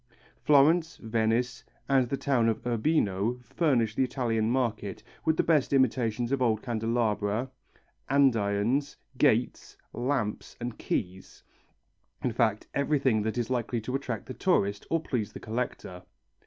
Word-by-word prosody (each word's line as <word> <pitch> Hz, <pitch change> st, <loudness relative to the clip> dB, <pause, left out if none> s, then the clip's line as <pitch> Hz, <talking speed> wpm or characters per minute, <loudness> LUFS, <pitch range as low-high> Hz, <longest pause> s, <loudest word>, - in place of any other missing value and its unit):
Florence, 155 Hz, +3 st, +4 dB
Venice, 115 Hz, +1 st, -1 dB, 0.2 s
and 130 Hz, -3 st, +3 dB
the 140 Hz, -, -1 dB
town 125 Hz, -5 st, +2 dB
of 110 Hz, -, -3 dB
Urbino 115 Hz, -3 st, +1 dB
furnish 120 Hz, -7 st, +1 dB
the 130 Hz, -, +1 dB
Italian 120 Hz, -4 st, 0 dB
market 115 Hz, -6 st, -2 dB, 0.2 s
with 160 Hz, 0 st, +2 dB
the -, -, +3 dB
best 150 Hz, -5 st, +2 dB
imitations 125 Hz, -3 st, +1 dB
of 140 Hz, -1 st, 0 dB
old 110 Hz, -3 st, +1 dB
candelabra, 115 Hz, 0 st, -1 dB, 0.6 s
andirons, 125 Hz, 0 st, +2 dB, 0.2 s
gates, -, -, +1 dB, 0.2 s
lamps, 120 Hz, -4 st, -2 dB
and 120 Hz, -1 st, -5 dB
keys; 95 Hz, 0 st, -4 dB, 0.8 s
in 125 Hz, -, +1 dB
fact 110 Hz, -3 st, +1 dB
everything 140 Hz, -5 st, +2 dB
that 110 Hz, +2 st, -2 dB
is 120 Hz, +1 st, -2 dB
likely 120 Hz, -1 st, -1 dB
to 115 Hz, +4 st, -5 dB
attract 125 Hz, -6 st, -3 dB
the 130 Hz, -, -7 dB
tourist 100 Hz, -, 0 dB
or 165 Hz, -, +2 dB
please 115 Hz, -9 st, -2 dB
the -, -, -8 dB
collector. 110 Hz, -5 st, -4 dB
120 Hz, 135 wpm, -28 LUFS, 110-135 Hz, 0.8 s, Florence